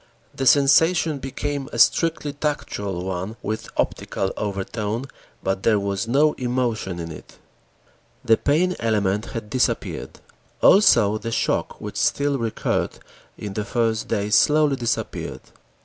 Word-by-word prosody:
The 135 Hz, -, -2 dB
sensation 155 Hz, +2 st, +4 dB
became 140 Hz, +1 st, -4 dB
a -, -, -5 dB
strictly 165 Hz, -3 st, +3 dB
tactual 100 Hz, -, -3 dB
one 95 Hz, +3 st, -4 dB
with 110 Hz, +1 st, -4 dB
optical 95 Hz, -, -1 dB
overtone, 105 Hz, +4 st, -3 dB, 0.4 s
but 95 Hz, 0 st, -1 dB
there 110 Hz, -1 st, +3 dB
was 100 Hz, +1 st, -2 dB
no 145 Hz, +5 st, +3 dB
emotion 120 Hz, -7 st, -1 dB
in 85 Hz, -1 st, -5 dB
it. 75 Hz, -, -12 dB, 0.9 s
The 115 Hz, -, +6 dB
pain 175 Hz, +9 st, +1 dB
element 105 Hz, -2 st, 0 dB
had 115 Hz, -4 st, -6 dB
disappeared. 130 Hz, -, -1 dB, 0.4 s
Also 110 Hz, -, +5 dB
the 115 Hz, -, -5 dB
shock, -, -, -1 dB
which -, -, -7 dB
still 140 Hz, -1 st, +1 dB
recurred 115 Hz, -2 st, -1 dB, 0.4 s
in 105 Hz, -2 st, -6 dB
the 105 Hz, -, -2 dB
first 115 Hz, -1 st, -1 dB
days 105 Hz, -1 st, -1 dB
slowly 150 Hz, -2 st, +4 dB
disappeared. 120 Hz, -3 st, -3 dB
115 Hz, 130 wpm, -23 LUFS, 105-140 Hz, 0.9 s, The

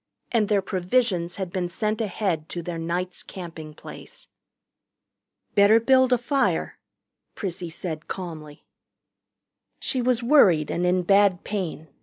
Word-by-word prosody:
And 220 Hz, -4 st, +2 dB
their 200 Hz, -2 st, +2 dB
provisions 185 Hz, -2 st, 0 dB
had 190 Hz, -3 st, -5 dB
been 180 Hz, -2 st, -1 dB
sent 215 Hz, +4 st, -1 dB
ahead 185 Hz, -6 st, -2 dB
to 175 Hz, -, -5 dB
their 170 Hz, 0 st, -4 dB
night's 175 Hz, +2 st, -3 dB
camping 165 Hz, -4 st, -9 dB
place. -, -, -11 dB, 1.3 s
"Better 205 Hz, +2 st, +6 dB
build 260 Hz, +2 st, +4 dB
a 250 Hz, -, +5 dB
fire," 270 Hz, +3 st, 0 dB, 0.6 s
Prissy 180 Hz, -3 st, -4 dB
said 160 Hz, -1 st, -6 dB
calmly. 155 Hz, -5 st, -7 dB, 1.1 s
She 260 Hz, -, -1 dB
was 245 Hz, -1 st, +1 dB
worried 195 Hz, -, +5 dB
and 175 Hz, +1 st, 0 dB
in 180 Hz, 0 st, +2 dB
bad 195 Hz, 0 st, +4 dB
pain. 180 Hz, -6 st, -4 dB
185 Hz, 130 wpm, -25 LUFS, 170-220 Hz, 1.3 s, Better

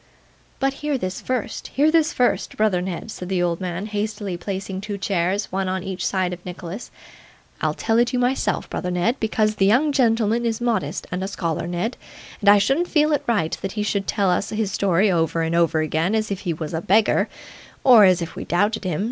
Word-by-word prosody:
'But 270 Hz, 0 st, +1 dB
hear 295 Hz, -2 st, 0 dB
this 185 Hz, -5 st, -4 dB
first 255 Hz, -4 st, -3 dB
hear 300 Hz, +3 st, +4 dB
this 325 Hz, 0 st, +3 dB
first, 250 Hz, -, 0 dB
brother 210 Hz, -4 st, +2 dB
Ned,' 190 Hz, +4 st, -5 dB
said 180 Hz, -3 st, -7 dB
the 185 Hz, -2 st, +1 dB
old 170 Hz, 0 st, -1 dB
man, 180 Hz, +1 st, -3 dB
hastily, 210 Hz, -2 st, -3 dB
placing 190 Hz, +1 st, -5 dB
two 205 Hz, 0 st, -5 dB
chairs, 195 Hz, +1 st, -1 dB
one 190 Hz, 0 st, -1 dB
on 185 Hz, -1 st, -2 dB
each 190 Hz, -2 st, -4 dB
side 185 Hz, -2 st, 0 dB
of 175 Hz, 0 st, -9 dB
Nicholas: 180 Hz, +4 st, -7 dB, 0.7 s
'I'll -, -, 0 dB
tell 225 Hz, 0 st, +1 dB
it 240 Hz, 0 st, +2 dB
you 250 Hz, -, -1 dB
myself, 250 Hz, +2 st, 0 dB
brother 180 Hz, -, -3 dB
Ned, 180 Hz, +8 st, 0 dB
because 215 Hz, -1 st, 0 dB
the 195 Hz, -, +3 dB
young 265 Hz, +9 st, +3 dB
gentleman 230 Hz, -3 st, +2 dB
is 230 Hz, -2 st, -1 dB
modest, 225 Hz, -11 st, -1 dB
and 180 Hz, +1 st, -2 dB
is 190 Hz, -, -3 dB
a -, -, -10 dB
scholar, 165 Hz, -2 st, -2 dB
Ned, 175 Hz, +8 st, -2 dB, 0.4 s
and 200 Hz, -, +4 dB
I 205 Hz, -, +8 dB
shouldn't 270 Hz, -, +2 dB
feel 305 Hz, -2 st, +2 dB
it 290 Hz, -1 st, 0 dB
right 205 Hz, -9 st, +1 dB
that 195 Hz, -, -4 dB
he 210 Hz, -, -2 dB
should 200 Hz, -2 st, -1 dB
tell 195 Hz, -3 st, +1 dB
us 180 Hz, -, 0 dB
his 215 Hz, -2 st, -2 dB
story 195 Hz, +1 st, +2 dB
over 165 Hz, -1 st, +1 dB
and 160 Hz, 0 st, -1 dB
over 165 Hz, -2 st, +2 dB
again 160 Hz, +6 st, 0 dB
as 215 Hz, -1 st, -1 dB
if 195 Hz, -, -2 dB
he 180 Hz, -, -2 dB
was 155 Hz, +1 st, -6 dB
a 160 Hz, -, -1 dB
beggar, 210 Hz, +5 st, +3 dB, 0.5 s
or 245 Hz, -5 st, +8 dB
as 185 Hz, -3 st, +4 dB
if 170 Hz, -, -8 dB
we -, -, -5 dB
doubted 205 Hz, +5 st, 0 dB
him. 180 Hz, -5 st, -2 dB
200 Hz, 220 wpm, -22 LUFS, 180-225 Hz, 0.7 s, I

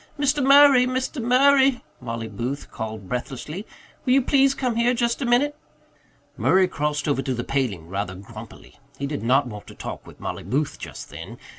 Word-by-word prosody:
"Mr. 285 Hz, 0 st, +1 dB
Murray, 275 Hz, -2 st, +7 dB
Mr. 260 Hz, +2 st, -2 dB
Murray," 265 Hz, +2 st, +4 dB, 0.2 s
Mollie 115 Hz, -2 st, -5 dB
Booth 120 Hz, +7 st, -5 dB
called 110 Hz, -3 st, -6 dB
breathlessly. 135 Hz, -, -5 dB, 0.4 s
"Will 250 Hz, -, +2 dB
you 270 Hz, -, +5 dB
please 275 Hz, +1 st, +3 dB
come 250 Hz, -3 st, -1 dB
here 240 Hz, +2 st, +2 dB
just 235 Hz, +1 st, 0 dB
a 255 Hz, -, -1 dB
minute?" 275 Hz, +5 st, +2 dB, 0.8 s
Murray 185 Hz, 0 st, +3 dB
crossed 150 Hz, -3 st, -2 dB
over 140 Hz, -2 st, +1 dB
to 130 Hz, -1 st, -2 dB
the 120 Hz, -, -3 dB
paling 120 Hz, -13 st, -2 dB
rather 95 Hz, 0 st, -4 dB
grumpily. 110 Hz, +7 st, -12 dB, 0.2 s
He 140 Hz, -, -3 dB
did 145 Hz, 0 st, -4 dB
not 130 Hz, +5 st, +3 dB
want 105 Hz, -4 st, -9 dB
to -, -, -12 dB
talk -, -, -7 dB
with -, -, -14 dB
Mollie -, -, -5 dB
Booth 135 Hz, -, -2 dB
just -, -, -9 dB
then. 95 Hz, +9 st, -9 dB
150 Hz, 180 wpm, -23 LUFS, -, 0.8 s, Murray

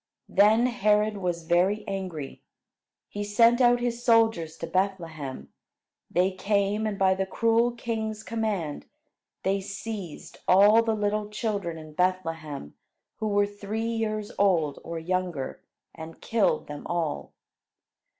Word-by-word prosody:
Then 215 Hz, +4 st, +5 dB
Herod 215 Hz, -3 st, +2 dB
was 175 Hz, -3 st, -2 dB
very 180 Hz, +5 st, +1 dB
angry. 185 Hz, -8 st, -5 dB, 0.7 s
He 205 Hz, -, -5 dB
sent 230 Hz, +4 st, +4 dB
out 245 Hz, 0 st, +5 dB
his 240 Hz, 0 st, -2 dB
soldiers 225 Hz, -9 st, +3 dB
to -, -, -4 dB
Bethlehem. 165 Hz, -6 st, -3 dB, 0.6 s
They 180 Hz, +2 st, +2 dB
came, 200 Hz, +2 st, 0 dB
and 205 Hz, -2 st, -3 dB
by 190 Hz, -1 st, +4 dB
the 190 Hz, 0 st, -2 dB
cruel 230 Hz, +3 st, +2 dB
king's 220 Hz, -2 st, -4 dB
command 210 Hz, -10 st, -3 dB, 0.6 s
they 195 Hz, +1 st, +1 dB
seized 200 Hz, -3 st, -7 dB
all 205 Hz, +4 st, +7 dB
the 225 Hz, -1 st, 0 dB
little 210 Hz, 0 st, -1 dB
children 205 Hz, -6 st, -3 dB
in 155 Hz, -1 st, -11 dB
Bethlehem 165 Hz, -, -2 dB, 0.4 s
who 220 Hz, -, -2 dB
were 205 Hz, -1 st, +3 dB
three 205 Hz, +2 st, -4 dB
years 215 Hz, -1 st, -2 dB
old, 170 Hz, -8 st, +2 dB
or 165 Hz, 0 st, -5 dB
younger, 175 Hz, -4 st, -3 dB, 0.3 s
and 160 Hz, 0 st, -10 dB
killed 225 Hz, -3 st, +1 dB
them 145 Hz, 0 st, -8 dB
all. 165 Hz, -4 st, -2 dB
200 Hz, 130 wpm, -27 LUFS, 175-220 Hz, 0.7 s, all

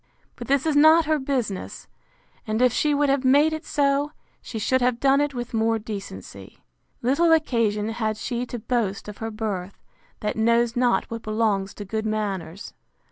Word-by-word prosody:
—But -, -, -8 dB
this 275 Hz, +1 st, +2 dB
is 315 Hz, -2 st, +1 dB
not 315 Hz, +2 st, +6 dB
her 310 Hz, 0 st, +1 dB
business: 255 Hz, -8 st, -3 dB, 0.6 s
And 215 Hz, +1 st, -1 dB
if 250 Hz, -1 st, +4 dB
she 300 Hz, +4 st, +1 dB
would 290 Hz, 0 st, +2 dB
have 275 Hz, -1 st, +1 dB
made 290 Hz, +4 st, +4 dB
it 315 Hz, +1 st, -4 dB
so, 285 Hz, 0 st, 0 dB, 0.3 s
she 230 Hz, -, -7 dB
should 255 Hz, +4 st, +1 dB
have 245 Hz, -1 st, +1 dB
done 275 Hz, +1 st, +4 dB
it 290 Hz, -2 st, -1 dB
with 240 Hz, 0 st, -5 dB
more 225 Hz, 0 st, +2 dB
decency. 210 Hz, -2 st, -8 dB, 0.5 s
Little 300 Hz, +7 st, +3 dB
occasion 230 Hz, -9 st, +1 dB
had 220 Hz, -1 st, -2 dB
she 245 Hz, +2 st, -3 dB
to 240 Hz, -, -5 dB
boast 220 Hz, -4 st, -2 dB
of 210 Hz, -, -9 dB
her 225 Hz, -, -3 dB
birth, 205 Hz, -4 st, -5 dB, 0.4 s
that 210 Hz, -, -2 dB
knows 230 Hz, +1 st, +2 dB
not 245 Hz, -1 st, +2 dB
what 230 Hz, 0 st, -4 dB
belongs 215 Hz, -3 st, -1 dB
to 205 Hz, -, -7 dB
good 220 Hz, +2 st, -3 dB
manners. 200 Hz, -4 st, -4 dB
235 Hz, 180 wpm, -24 LUFS, 215-275 Hz, 0.6 s, not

